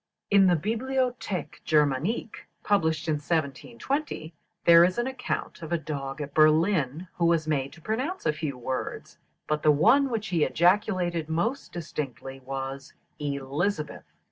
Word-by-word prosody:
In 195 -1 +6
the 180 - +4
"Bibliothèque 235 - -2
Germanique," 155 - 0 0.2
published 160 -6 +1
in 155 -1 +1
1720, 165 - -3 0.3
there 170 0 +8
is 180 +4 +2
an 240 - +1
account 260 -7 -4
of 160 -1 -7
a 170 - +2
dog 140 -2 -5
at 145 -1 -6
Berlin, 155 0 +3
who 170 - +2
was 165 -2 +2
made 140 -3 0
to 170 - -15
pronounce 260 - -3
a 155 - +2
few 150 -4 -4
words, 130 +1 -5 0.3
but 150 0 -1
the 155 - +4
one 230 - +5
which 220 -3 -3
he 170 -4 +2
ejaculated 175 -2 +1
most 220 - -1
distinctly 135 -5 -6
was 135 +1 -6 0.3
"Elizabeth." 145 +4 -2
160 Hz, 145 wpm, -27 LUFS, 145-205 Hz, 0.3 s, there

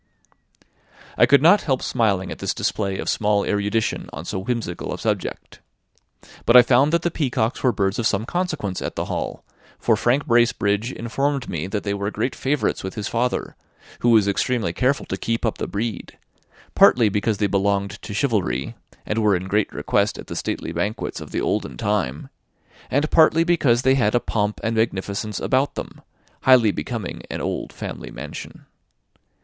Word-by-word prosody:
I - - +5
could 140 0 +5
not 180 +6 +6
help 130 -4 -1
smiling 105 -6 0
at - - -7
this - - -2
display 100 -3 -1
of - - -5
small 105 -1 +1
erudition 105 +2 -1
on 75 +3 -7
so 95 - -3
whimsical 110 -4 -3
a - - -3
subject; - - -3 0.9
but 120 - +8
I 125 - +10
found 135 +4 +4
that 170 0 +1
the 175 - 0
peacocks 125 -7 -1
were 130 - +3
birds 100 -2 -1
of 115 - +2
some 105 +1 -1
consequence 155 - -2
at - - -4
the - - -2
Hall, - - -4 0.3
for 115 - +2
Frank 120 +6 +1
Bracebridge 115 -1 +2
informed 135 +3 -2
me 80 +1 -3
that 105 +1 -3
they 100 - -1
were 100 0 -2
great 110 +5 -2
favourites 140 +1 -1
with 95 - -5
his 105 -3 -3
father, 125 +2 -1 0.4
who 120 - +2
was 110 -3 +5
extremely 100 -2 0
careful 135 +6 +1
to 95 - -4
keep 115 +4 -2
up 110 - -1
the - - -2
breed; 105 -2 -4 0.6
partly 120 -3 +6
because 105 +1 0
they 105 - +1
belonged 100 0 0
to 105 - -7
chivalry, 100 - 0 0.3
and 105 - -1
were 105 -2 +4
in 90 +1 -3
great 105 +2 +1
request - - 0
at - - -8
the - - -7
stately - - -3
banquets 90 +6 -3
of - - -9
the - - -2
olden 65 - -2
time; 90 -7 -1 0.6
and 145 +3 0
partly 160 0 +5
because 140 -8 +2
they 130 - +4
had 120 -4 +2
a - - +5
pomp 105 -2 -2
and 115 0 0
magnificence 105 -1 -1
about 135 +2 +1
them, - - -7 0.4
highly 125 -5 +5
becoming 115 -4 -5
an - - -4
old - - -3
family - - -7
mansion. - - -9
110 Hz, 180 wpm, -22 LUFS, 100-125 Hz, 0.9 s, I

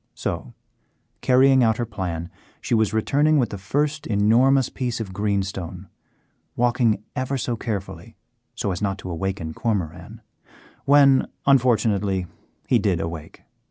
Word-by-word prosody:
So, - - -5 0.7
carrying 130 0 +5
out 110 -1 +2
her 120 - -1
plan, 90 -6 -5 0.3
she - - -3
was 110 -3 +2
returning 145 +8 +2
with 125 -4 +1
the 100 - -6
first 145 +9 -1
enormous 120 +6 +3
piece 125 -3 -3
of 100 -4 -5
greenstone, 95 -3 -3 0.7
walking 120 -3 +1
ever 130 +1 -2
so 120 -1 -2
carefully 105 -4 -6 0.4
so 100 - -2
as 90 - -4
not 100 -1 -1
to 95 -2 -7
awaken 90 -2 -3
Cormoran, 95 -9 -3 0.6
when, 140 -1 +5 0.2
unfortunately, 105 -8 +2 0.4
he - - +3
did - - +1
awake. 80 -2 -7
110 Hz, 130 wpm, -23 LUFS, 95-130 Hz, 0.7 s, carrying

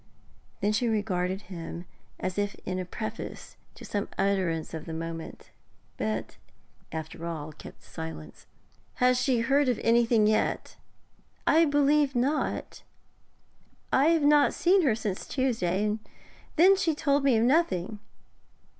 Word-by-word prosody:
Then 205 +1 +2
she 225 +3 +1
regarded 195 -3 -1
him 170 -1 -7 0.3
as 185 +2 -2
if 205 0 -1
in 185 0 -2
preface 220 +3 -6 0.2
to - - -11
some 205 -1 -3
utterance 185 -5 0
of 160 0 -6
moment, 165 0 -6 0.4
but 110 +1 -3 0.5
after 160 +1 -6
all 155 -2 -5
kept - - -13
silence. 75 -2 -9 0.5
'Has 250 0 +3
she 250 -4 +2
heard 275 +3 +3
of 245 - 0
anything 230 -1 +4
yet?' 215 0 0 0.7
'I 330 +1 +5
believe 290 -1 +3
not. 275 +5 -1 1.1
I 270 - +5
have 325 -1 +3
not 290 0 +5
seen 370 +2 +4
her 265 -10 +2
since 210 -4 -4
Tuesday, 225 -8 0
and 210 +1 -1 0.6
then 370 +5 +7
she 335 -5 0
told 285 -1 +1
me 265 -4 +4
of 220 - +2
nothing. 220 - +1
215 Hz, 130 wpm, -28 LUFS, 180-275 Hz, 1.1 s, then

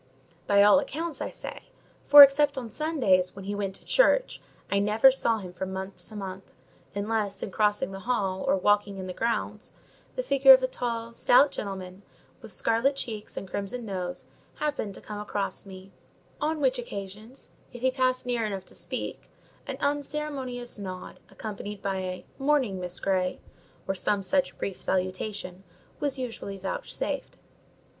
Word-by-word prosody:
By 200 0 +6
all 210 +7 +7
accounts, 310 0 -4
I - - -2
say; - - -8 0.5
for, 290 0 +13
except 280 +1 +4
on 240 -4 -5
Sundays, 235 - +1
when 195 -1 -8
he 205 - -2
went 200 -2 -3
to - - -18
church, - - +3 0.3
I 200 - +3
never 215 +6 +6
saw 235 -3 +1
him 185 -4 -8
from 190 +1 -4
month 190 +1 -6
to 215 - -11
month: 190 -1 -6 0.5
unless, 205 -1 -1
in - - -4
crossing 210 -2 +1
the 195 - -6
hall 195 -4 -1
or - - +4
walking 205 +1 +2
in 190 - -5
the 185 - -5
grounds, 230 +4 -2 0.4
the - - -1
figure 390 - +8
of - - +5
a - - +3
tall, 235 - -3
stout 270 +4 +5
gentleman, 190 -3 -6 0.4
with - - -11
scarlet 230 +5 +2
cheeks 220 -6 -5
and 195 - -5
crimson 205 +6 -4
nose, 180 -3 -4 0.3
happened 290 -10 -2
to - - -11
come 210 -1 -7
across 205 -1 -3
me; 190 0 -11 0.5
on 310 +1 0
which 260 -2 +2
occasions, 215 +2 -8 0.2
if 245 - -10
he 260 0 +3
passed 255 -1 +1
near 240 -2 0
enough 195 -3 -3
to - - -16
speak, - - -6 0.4
an - - -4
unceremonious 285 -5 -3
nod, 185 -2 -7
accompanied 210 -1 -6
by 195 -1 -1
a 185 -1 -4
"Morning, 270 -9 +2
Miss 180 0 -5
Grey," 185 -2 0 0.5
or 195 - +1
some 195 +1 0
such 280 +7 0
brief 195 - -4
salutation, 185 0 -2 0.4
was 285 -2 -1
usually 230 -6 -5
vouchsafed. 195 - -4
210 Hz, 165 wpm, -27 LUFS, 195-260 Hz, 0.5 s, for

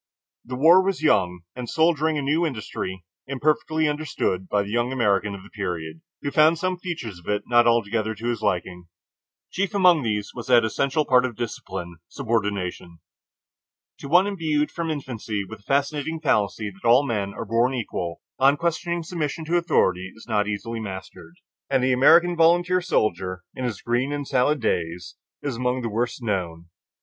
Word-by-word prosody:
The 125 - -6
war 165 +8 +6
was 190 -4 -2
young 90 - +2
and 125 -2 -6
soldiering 160 -1 +2
a 145 - -2
new 150 +5 +1
industry, 105 - -4 0.2
imperfectly 155 +3 +1
understood 145 -11 -2
by 105 -1 +2
the 100 - -7
young 120 +2 0
American 105 -5 +1
of 95 - -10
the - - -16
period, 80 -6 -5 0.2
who 140 - -2
found 155 +3 +5
some 185 +1 -2
features 130 - -5
of 85 - -19
it 105 0 0
not 120 0 +4
altogether 110 -1 +1
to 115 +3 -5
his 120 - -2
liking. 90 -3 -2 0.6
Chief 200 +2 -2
among 180 -5 +5
these 105 -4 -2
was 120 - -7
that 120 -3 +5
essential 140 +7 0
part 125 -2 +4
of 125 -3 -3
discipline, 95 -6 -6
subordination. 100 -8 -2 1.0
To - - -7
one 175 +6 +5
imbued 160 -7 0
from 170 -1 -3
infancy 115 -8 -4
with 110 +1 -9
the 100 - -27
fascinating 145 +3 0
fallacy 105 -7 0
that 95 +4 -6
all 130 +4 +6
men 105 -6 -2
are 115 - -5
born 115 +4 +1
equal, 90 -8 -4 0.2
unquestioning 165 +5 +1
submission 160 -1 -3
to 165 +3 0
authority 95 - +1
is 110 - -14
not 105 -3 +1
easily 115 +2 -4
mastered, 95 - -8 0.3
and 135 -2 +2
the 130 0 +3
American 170 +7 +5
volunteer 175 +2 +4
soldier 95 - -1
in 130 - -4
his 115 -6 -4
"green 120 +4 0
and 145 -1 -3
salad 140 +2 +2
days" 85 -4 -2 0.3
is 140 -5 -3
among 125 0 -1
the 115 - -2
worst 120 +3 -2
known. 85 -6 -3
120 Hz, 175 wpm, -24 LUFS, 105-155 Hz, 1.0 s, war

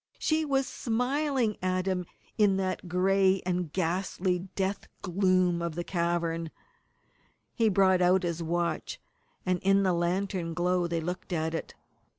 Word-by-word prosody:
she 315 0 +1
was 275 -3 +1
smiling 250 0 0
at 185 0 0
him 185 -2 -1 0.3
in 205 -3 +3
that 185 -1 -2
gray 190 +1 +3
and 180 -3 -1
ghastly 180 +1 0 0.2
death 195 +1 -2 0.2
gloom 185 -2 +2
of 170 -2 -3
the 175 - -2
cavern! 170 -2 -1 1.0
He 225 -3 +2
brought 190 -2 +4
out 180 +1 +4
his 170 -1 -2
watch, 170 +1 -2 0.5
and 185 -1 +1
in 195 +2 +3
the 185 -2 +2
lantern 175 0 -1
glow 180 0 +1
they 165 -1 -1
looked 180 +3 -5
at 160 -1 -1
it. 165 - -5
185 Hz, 145 wpm, -29 LUFS, 175-195 Hz, 1.0 s, brought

